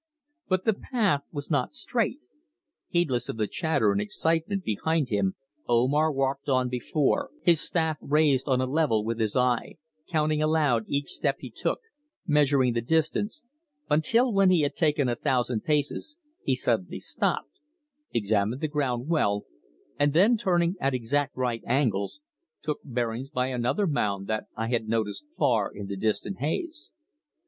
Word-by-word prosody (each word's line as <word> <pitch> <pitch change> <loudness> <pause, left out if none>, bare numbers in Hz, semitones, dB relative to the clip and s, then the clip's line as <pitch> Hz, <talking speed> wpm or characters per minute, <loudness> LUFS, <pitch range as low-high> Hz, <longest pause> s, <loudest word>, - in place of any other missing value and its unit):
But 185 -1 0
the 220 - +4
path 205 - 0
was 145 0 -6
not 145 - 0
straight. 245 +1 -1 0.7
Heedless 155 -9 0
of - - -4
the 110 - +1
chatter 140 - +1
and 100 0 0
excitement 165 - -1
behind 155 - 0
him 100 -3 0 0.3
Omar 135 +7 +3
walked 135 0 -1
on 130 -1 +2
before, 130 +3 0
his 170 -4 +4
staff 160 -3 0
raised 145 -2 +2
on 130 -1 +3
a 130 - +1
level 130 -6 +1
with 115 +1 -2
his 110 -2 0
eye, 125 -2 +1 0.3
counting 155 -2 +1
aloud 150 -7 +2
each 140 0 -1
step - - 0
he - - -8
took, - - -1 0.4
measuring 140 -6 +3
the 115 - 0
distance, 160 - 0 0.5
until 230 - +3
when 195 -1 +5
he 180 -3 +4
had 145 - 0
taken 150 -4 +2
a 120 - +1
thousand 125 -2 0
paces 150 - -1 0.2
he - - +1
suddenly - - 0
stopped, - - -1 0.5
examined 110 +2 0
the 155 - +1
ground 135 -4 -1
well, 105 -11 +1 0.6
and 145 0 +3
then 200 +9 +5
turning 175 -5 +1
at 135 -1 +1
exact 135 +4 -1
right 125 -3 -1
angles, 120 - 0 0.4
took 150 -1 -2
bearings 120 0 -3
by 125 -2 -1
another 125 - 0
mound 100 - 0
that 110 +1 -2
I 115 +1 -2
had 115 -3 0
noticed 110 - -1
far 110 -6 +2
in 100 - -7
the 100 0 -4
distant 110 - -1
haze. 310 - -3
140 Hz, 155 wpm, -27 LUFS, 120-160 Hz, 0.7 s, when